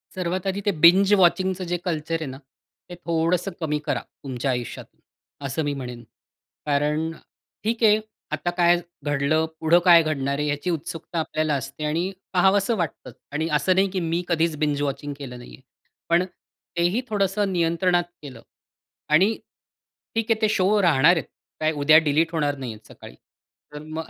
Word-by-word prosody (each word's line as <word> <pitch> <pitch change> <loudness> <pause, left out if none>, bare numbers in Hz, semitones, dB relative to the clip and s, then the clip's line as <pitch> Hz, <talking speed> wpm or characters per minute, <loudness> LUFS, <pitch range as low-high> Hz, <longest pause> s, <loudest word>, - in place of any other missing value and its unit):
सर्वात 185 0 -2
आधी 195 +1 -3
ते 205 - +3
बिंज 190 +4 +7
वॉचिंगचं 185 +1 +2
जे 175 - +1
कल्चर 160 -1 -2
आहे - - -3
ना, - - -9 0.5
ते 175 - -7
थोडंसं 170 +3 0
कमी 150 -2 -1
करा - - 0 0.2
तुमच्या 130 0 -2
आयुष्यात. 120 -2 -4 0.6
असं 140 +4 -2
मी - - -1
म्हणेन. 125 -2 -7 0.6
कारण 150 +2 0 0.5
ठीक 225 +2 -1
आहे 210 0 +5 0.4
आता 155 +3 -3
काय 175 0 +5 0.3
घडलं, 145 +3 +1
पुढं 165 +2 +4
काय 170 -2 +8
घडणार 140 -3 -1
आहे 150 - 0
याची 145 +4 -2
उत्सुकता 165 +1 -4
आपल्याला 155 -1 -1
असते 155 - -6
आणि 155 +3 0 0.3
पाहावंसं 195 +4 +3
वाटतं. 160 -7 -4 0.2
आणि 155 +2 -1
असं 185 +5 +1
नाही 195 +1 +3
की 190 - -1
मी 165 +2 0
कधीच 165 -2 +1
बिंज 145 -1 0
वॉचिंग 145 0 -3
केलं 125 -3 -7
नाहीये. 120 +1 -13 0.5
पण 170 +2 +3 0.5
तेही 175 +8 +2
थोडंसं 200 -1 0
नियंत्रणात 175 +1 +2 0.2
केलं 130 -6 -10 0.7
आणि 185 +7 +6 0.9
ठीक 225 0 0
आहे 220 0 +1
ते 215 - +3
शो 205 0 +2
राहणार 165 -1 +5
आहेत. 165 - -2 0.3
काय 155 0 +1
उद्या 155 +2 +7
डिलीट 160 +3 +2
होणार 145 -3 0
नाहीयेत 110 -5 -8
सकाळी. - - -13 0.6
तर 150 - -6 0.2
मग 160 - -5
165 Hz, 160 wpm, -24 LUFS, 145-185 Hz, 0.9 s, काय